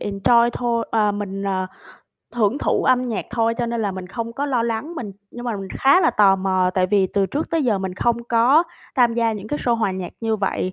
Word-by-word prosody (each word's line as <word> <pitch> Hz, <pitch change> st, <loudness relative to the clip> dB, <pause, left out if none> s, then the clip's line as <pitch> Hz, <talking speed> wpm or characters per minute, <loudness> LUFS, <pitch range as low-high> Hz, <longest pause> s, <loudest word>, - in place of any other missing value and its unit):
enjoy 235 Hz, +4 st, +2 dB
thôi. 235 Hz, -1 st, -1 dB
Ờ, 210 Hz, -2 st, +2 dB
mình, 200 Hz, -1 st, -5 dB
ờ, 190 Hz, -1 st, -1 dB, 0.7 s
hưởng 225 Hz, +3 st, +1 dB
thụ -, -, 0 dB
âm 255 Hz, -1 st, +2 dB
nhạc 225 Hz, -, -3 dB
thôi, 230 Hz, -1 st, +1 dB
cho 240 Hz, -, 0 dB
nên 235 Hz, -1 st, -2 dB
là 200 Hz, -2 st, -1 dB
mình 185 Hz, -1 st, -7 dB
không 230 Hz, +3 st, -5 dB
có 280 Hz, +4 st, -3 dB
lo 255 Hz, -5 st, 0 dB
lắng, 235 Hz, +8 st, -3 dB
mình 225 Hz, -10 st, -6 dB, 0.2 s
nhưng 240 Hz, -, -9 dB
mà 235 Hz, -3 st, -2 dB
mình 195 Hz, -1 st, -7 dB
khá 275 Hz, +7 st, +5 dB
là 330 Hz, -, +3 dB
tò 195 Hz, -2 st, +4 dB
mò, 185 Hz, -1 st, +1 dB
tại 185 Hz, -1 st, +2 dB
vì 195 Hz, 0 st, +2 dB
từ 200 Hz, -1 st, +2 dB
trước 295 Hz, +10 st, -4 dB
tới 325 Hz, -3 st, +1 dB
giờ 220 Hz, -5 st, +1 dB
mình 190 Hz, -1 st, -4 dB
không 235 Hz, +4 st, 0 dB
có 240 Hz, +8 st, +4 dB, 0.3 s
tham 240 Hz, -3 st, +4 dB
gia 230 Hz, -1 st, +1 dB
những 210 Hz, 0 st, -7 dB
cái 295 Hz, -, -2 dB
show 240 Hz, -, +1 dB
hòa 220 Hz, -4 st, 0 dB
nhạc 185 Hz, -2 st, -6 dB
như 225 Hz, -1 st, 0 dB
vậy, 190 Hz, -2 st, -2 dB
225 Hz, 245 wpm, -21 LUFS, 195-240 Hz, 0.7 s, khá